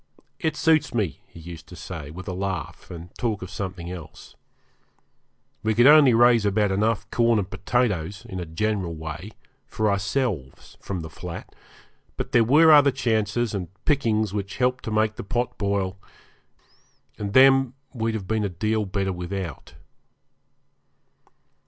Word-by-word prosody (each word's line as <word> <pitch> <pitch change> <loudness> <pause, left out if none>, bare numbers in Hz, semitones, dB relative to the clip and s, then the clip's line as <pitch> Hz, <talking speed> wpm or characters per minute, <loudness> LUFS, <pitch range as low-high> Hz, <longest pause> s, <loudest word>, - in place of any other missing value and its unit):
'It 160 -2 -1
suits 155 -5 +2
me,' 100 -9 -1
he - - -14
used 80 -1 -10
to 90 - -11
say, 80 -6 -7
with 90 +6 -9
a 95 - -3
laugh, 95 -3 -4
and 85 0 -9
talk 110 -5 -1
of 95 - -8
something 90 -3 -5
else. 85 -4 -10 1.3
We 110 0 0
could 120 +2 +5
only 145 -4 +8
raise 120 -1 +5
about 105 0 +2
enough 105 +3 0
corn 115 -1 +3
and 100 -3 -1
potatoes, 100 -3 -1
in 95 - -6
a 90 - -5
general 90 0 -2
way, 80 +5 -7 0.4
for 110 -1 0
ourselves 100 - -2
from 95 -3 -4
the 80 - -7
flat; 85 +1 -8 0.6
but - - -4
there 120 - +5
were 155 +7 +6
other 145 -2 +7
chances 115 -3 0
and 95 -4 -3 0.2
pickings 110 -8 +1
which 100 -1 -4
helped 125 0 0
to 110 - -3
make 110 0 +1
the - - -5
pot 120 +4 -2
boil, 100 -2 -1 1.2
and 100 -1 -4
them 135 -1 +6 0.2
we'd 115 -2 -1
have 100 -4 -4
been 110 0 0
a 100 - -1
deal 105 +4 -1
better 95 0 -1
without. 90 -2 -6
105 Hz, 155 wpm, -24 LUFS, 90-120 Hz, 1.3 s, only